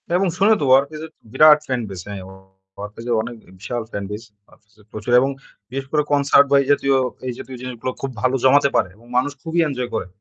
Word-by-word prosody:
এবং 195 +1 +2
শুনে 205 +4 +5
তো। 145 - +1
'Warfaze' 140 +4 +3
এর 160 - -13
তো - - -52
বিরাট 150 +2 +7
fan 130 -2 -1
base. 90 -3 -7
হ্যাঁ 100 -2 -6
অ - - -12 0.5
'Warfaze' 105 +3 -8
এর 115 - +3
অনেক 120 +1 -7 0.2
বিশাল 120 +3 -4
fan 100 - -4
base. 105 +3 -7 0.2
'Warfaze' 105 +1 -26
এর - - -24
প্রচুর 110 +3 -5
এবং 135 - +1 0.4
বিশেষ 135 +2 -4
করে 150 -1 +2
concert 140 0 +5
বা - - +5
এই - - -9
জাতীয়, 140 -1 +2 0.3
এই 125 - -2
জাতীয় 130 - -8
জিনিসগুলা 125 0 -5
খুব 135 - -3
ভালো 130 +1 +2
জমাতে 140 +2 +5
পারে 90 - +2
এবং 115 +3 -21
মানুষ 145 +3 +1
খুবই 165 +1 -1
enjoy 125 -4 -3
করে। - - -3
130 Hz, 230 wpm, -20 LUFS, 115-145 Hz, 0.5 s, বিরাট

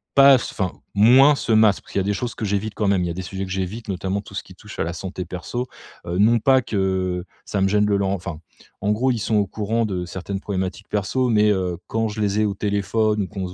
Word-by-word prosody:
pas, 140 0 +8
enfin 95 -7 -2 0.2
moins 125 +8 +7
ce 120 - -3
masque. 110 -2 +4
Parce - - -15
qu'il - - +1
y - - +2
a - - -1
des 105 - 0
choses 120 +3 -4
que 110 - -4
j'évite 100 +1 -2
quand 105 - 0
même, 95 -2 +2
il - - -1
y - - -3
a - - -2
des 95 - -4
sujets 95 +2 -5
que 95 - -9
j'évite 95 +4 -4
notamment 95 +1 -2
tout 100 -1 -13
ce - - -3
qui 95 - -14
touche 105 +2 -12
à - - +2
la 85 +1 -3
santé 90 +1 -5
perso. 95 +9 -4 0.4
Heu, 85 +1 -3
non 115 +3 +5
pas 130 +3 +4
que 95 -4 -1 0.2
ça 100 - -2
me 95 - +4
gêne 105 +1 +3
de 100 - +2
leur 100 -1 +1
enfin, 90 -4 -4 0.4
en 105 - +1
gros 125 +5 +1
ils 120 - -1
sont 110 +1 -1
au 100 - +2
courant 110 +4 -1
de 90 -3 -3
certaines 95 +2 -5
problématiques 95 0 -4
perso 125 +5 0
mais, 105 -2 +4
heu, 90 -3 -1
quand 115 0 -1
je 110 +1 -5
les 105 +1 +1
ai - - +3
au 100 - 0
téléphone 105 +1 0
ou - - -4
qu'on 95 -2 -5
se 90 - -9
100 Hz, 275 wpm, -22 LUFS, 95-110 Hz, 0.4 s, pas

